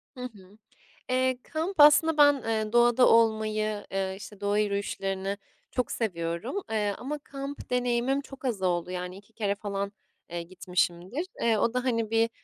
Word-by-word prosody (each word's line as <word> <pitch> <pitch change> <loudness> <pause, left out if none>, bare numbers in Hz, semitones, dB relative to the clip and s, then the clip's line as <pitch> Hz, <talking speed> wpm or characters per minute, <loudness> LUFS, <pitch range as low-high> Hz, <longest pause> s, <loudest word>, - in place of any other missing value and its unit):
Hı 250 - -8
hı. 205 -5 -10 0.5
Eee, 255 0 +2
kamp 325 +4 -3
aslında 300 +2 +7
ben, 290 -1 +8
eee, 220 -1 -1
doğada 240 +1 +5
olmayı, 215 -2 +2
eee, 190 0 -1
işte, 205 0 -11
doğa 205 0 +1
yürüyüşlerini 200 -1 -1 0.3
çok 250 - -1
seviyorum. 170 - -2 0.2
Eee, 210 -2 +1
ama 295 +4 -4
kamp 275 0 -7
deneyimim 250 +2 +1
çok 270 -1 -11
az 230 -7 -1
oldu, 180 -1 0
yani, 180 0 -5
2 205 +3 -17
kere 205 -2 -1
falan, 200 -1 -3 0.4
eee, 170 0 -4
gitmişimdir. 180 - -2 0.2
Eee, 230 -2 +3
o 230 +3 +1
da, 250 0 0
hani, 230 -4 0
bir, 225 0 +3
220 Hz, 160 wpm, -28 LUFS, 195-250 Hz, 0.5 s, ben